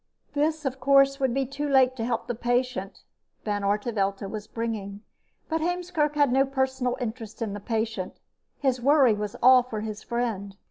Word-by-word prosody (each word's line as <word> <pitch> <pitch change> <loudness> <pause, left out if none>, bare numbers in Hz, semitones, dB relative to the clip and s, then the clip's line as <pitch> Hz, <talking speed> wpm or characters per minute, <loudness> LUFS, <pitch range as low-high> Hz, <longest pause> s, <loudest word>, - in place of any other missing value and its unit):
This, 305 +1 0
of 265 0 -2
course, 275 +1 +4
would 265 -2 +1
be 270 +2 0
too 280 +3 -4
late 260 -2 +4
to 225 - -2
help 230 -1 -1
the 240 - -2
patient 245 -3 -2 0.4
Van 205 -1 -1
Artevelde 200 -1 0
was 210 +1 -6
bringing, 210 -3 -4 0.5
but 320 0 -1
Heemskerk 345 -3 -1
had 290 -3 +3
no 265 +2 +4
personal 265 -2 -1
interest 225 -3 -5
in 220 -4 -3
the 205 - -5
patient. 220 -3 -3 0.4
His 260 -3 0
worry 275 -3 +5
was 210 -1 -4
all 255 0 +8
for 230 -4 -5
his 215 -1 -5
friend. 220 -5 -3
245 Hz, 175 wpm, -26 LUFS, 215-275 Hz, 0.5 s, all